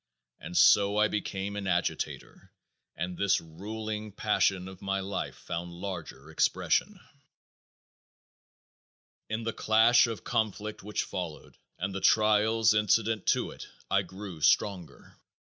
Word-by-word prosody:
And 90 - -5
so 100 0 +5
I 105 0 +4
became 100 -1 -3
an 100 -1 -4
agitator 90 -1 -3 0.4
and 90 +2 -4
this 100 +1 +2
ruling 105 +6 -6
passion 100 -2 +1
of 95 0 -11
my 100 0 -1
life 95 0 -4
found 85 +1 -6
larger 85 -5 -7
expression. - - +1 2.3
In 110 +1 -3
the 115 0 -2
clash 115 +3 +4
of 115 -2 -6
conflict 110 0 -2
which 105 +1 -2
followed 85 -4 -6 0.2
and 100 - -3
the 95 - -4
trials 110 +1 +4
incident 105 0 +1
to - - +1
it - - -10 0.2
I - - +4
grew 95 -4 -9
stronger. 90 0 0
100 Hz, 125 wpm, -29 LUFS, 90-110 Hz, 2.3 s, so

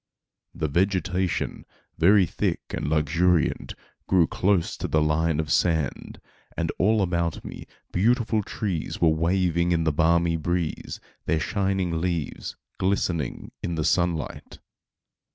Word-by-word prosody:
The 80 - -1
vegetation, 95 +2 0 0.4
very 95 +3 +6
thick - - -1
and - - -3
luxuriant, 80 +3 +1 0.3
grew 90 -3 +4
close 95 0 +1
to - - -3
the 80 - +2
line 75 +1 +1
of 80 -1 -2
sand, 80 -6 0 0.4
and - - 0
all 105 0 +3
around 85 -1 -2
me, - - -8 0.2
beautiful 110 +2 +2
trees 100 -5 -3
were 85 - +4
waving 85 +1 +1
in 85 -1 +2
the 80 -2 +1
balmy 85 +2 +3
breeze, 85 +1 -2 0.3
their 80 - +2
shining 95 -3 -1
leaves 85 -4 -3 0.2
glistening 90 -7 -1
in 85 - -2
the 80 -1 -1
sunlight. 85 -4 -1
85 Hz, 125 wpm, -25 LUFS, 80-95 Hz, 0.4 s, very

